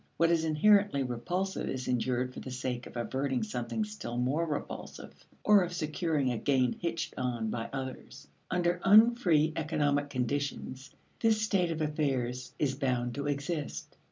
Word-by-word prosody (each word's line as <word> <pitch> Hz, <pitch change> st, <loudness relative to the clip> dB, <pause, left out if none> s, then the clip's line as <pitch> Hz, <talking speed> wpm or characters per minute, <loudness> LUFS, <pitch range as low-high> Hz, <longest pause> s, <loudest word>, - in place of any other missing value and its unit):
What 165 Hz, 0 st, +4 dB
is 165 Hz, -1 st, +2 dB
inherently 195 Hz, -1 st, +4 dB
repulsive 175 Hz, +11 st, -2 dB
is 130 Hz, -1 st, -4 dB
endured 125 Hz, +1 st, 0 dB
for -, -, -7 dB
the -, -, -7 dB
sake 125 Hz, -1 st, -4 dB
of -, -, -9 dB
averting 130 Hz, +1 st, -1 dB
something 120 Hz, -, -2 dB
still 210 Hz, -, -6 dB
more 140 Hz, +7 st, +1 dB
repulsive 150 Hz, -2 st, -5 dB, 0.3 s
or 210 Hz, -1 st, +6 dB
of 175 Hz, 0 st, -4 dB
securing 155 Hz, -4 st, 0 dB
a 120 Hz, -, -2 dB
gain 130 Hz, -3 st, +2 dB
hitched 170 Hz, -1 st, -3 dB
on 120 Hz, -4 st, -1 dB
by 115 Hz, -1 st, -3 dB
others. 130 Hz, -1 st, -7 dB, 0.2 s
Under 175 Hz, -1 st, +1 dB
unfree 200 Hz, -8 st, +5 dB
economic 145 Hz, -3 st, 0 dB
conditions, 135 Hz, +1 st, -3 dB, 0.3 s
this 225 Hz, -2 st, +3 dB
state 195 Hz, -5 st, +1 dB
of 160 Hz, -1 st, -3 dB
affairs 130 Hz, -5 st, -1 dB
is 140 Hz, -3 st, +1 dB
bound 125 Hz, -3 st, -1 dB
to 140 Hz, +2 st, -3 dB
exist. 140 Hz, -, -3 dB
145 Hz, 155 wpm, -30 LUFS, 125-170 Hz, 0.3 s, or